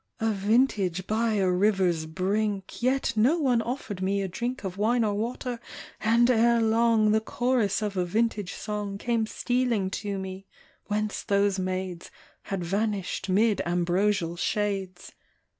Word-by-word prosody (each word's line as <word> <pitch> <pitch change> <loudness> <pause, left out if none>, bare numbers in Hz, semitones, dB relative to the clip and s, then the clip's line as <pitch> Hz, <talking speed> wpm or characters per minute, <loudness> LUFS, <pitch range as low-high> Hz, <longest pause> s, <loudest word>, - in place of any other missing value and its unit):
A 225 0 +1
vintage 200 -3 +1
by 220 +2 0
a 195 -3 +2
river's 180 -3 +2
brink, 195 +4 -2
Yet 260 +2 +1
no 245 +10 +4
one 255 -7 +2
offered 230 -6 -5
me 195 +1 0
a - - -2
drink 240 +8 -4
Of 185 -2 -4
wine 235 +3 +2
or 210 -2 +1
water, 240 +3 -3 0.4
and 230 +2 +4
ere 235 -1 +4
long 225 -1 +3
The 220 0 +3
chorus 230 -3 0
of 205 -2 -2
a 180 - +1
vintage 210 0 -1
song 205 -2 -4
Came 230 0 0
stealing 240 -6 0
to 200 -1 -3
me, 190 0 -7 0.4
whence 210 0 -1
those 200 -1 +1
maids 185 -1 -3 0.4
Had 195 -3 -3
vanished 195 0 -2
'mid 210 +2 +3
ambrosial 175 0 0
shades. 190 -2 -2
210 Hz, 145 wpm, -27 LUFS, 190-230 Hz, 0.4 s, no